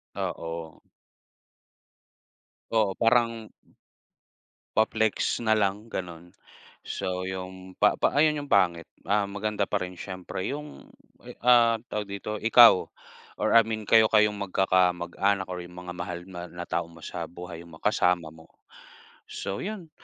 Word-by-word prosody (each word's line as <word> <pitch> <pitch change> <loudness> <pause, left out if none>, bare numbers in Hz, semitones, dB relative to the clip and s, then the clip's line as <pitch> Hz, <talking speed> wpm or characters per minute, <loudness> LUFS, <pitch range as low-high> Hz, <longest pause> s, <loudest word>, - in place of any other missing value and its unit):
Oo. 80 -1 -5 1.9
Oo, 110 -3 +2
parang 115 -1 +2 1.2
Pa-flex 110 +1 +1
na 110 - +1
lang 105 +1 0
gano'n. 85 -1 -6 0.5
So, 90 0 -4
yung 95 0 -7
pa - - +4
pa - - +1
ayun 150 +1 +3
yung 145 - -9
pangit. 85 -5 +3 0.2
Ah, 100 +1 +1
maganda 105 0 -2
pa - - 0
rin 90 0 -6
siyempre 95 -1 -5
yung, 150 - -7 0.4
eh, 125 - -9
ah, 120 -2 +6 0.2
tawag 105 -1 -3
dito, 105 +2 -5
ikaw 115 -3 +7 0.5
or - - 0
I - - +9
mean 110 -1 -3
kayo 110 0 +6
kayong 105 -1 +3
magkakamag-anak 95 0 +1
or 90 - -4
yung 90 0 -12
mga 90 0 -7
mahal 85 0 -4
mo 90 -2 -8
na 85 0 -7
tao 85 -1 -2
mo 85 -1 -16
sa 85 -1 -5
buhay 85 -1 -9
mo, 80 - -13
kasama 90 -6 +2
mo. 80 0 -16 0.8
So 95 - -5
yun, 190 -5 -6
95 Hz, 140 wpm, -27 LUFS, 90-110 Hz, 1.9 s, I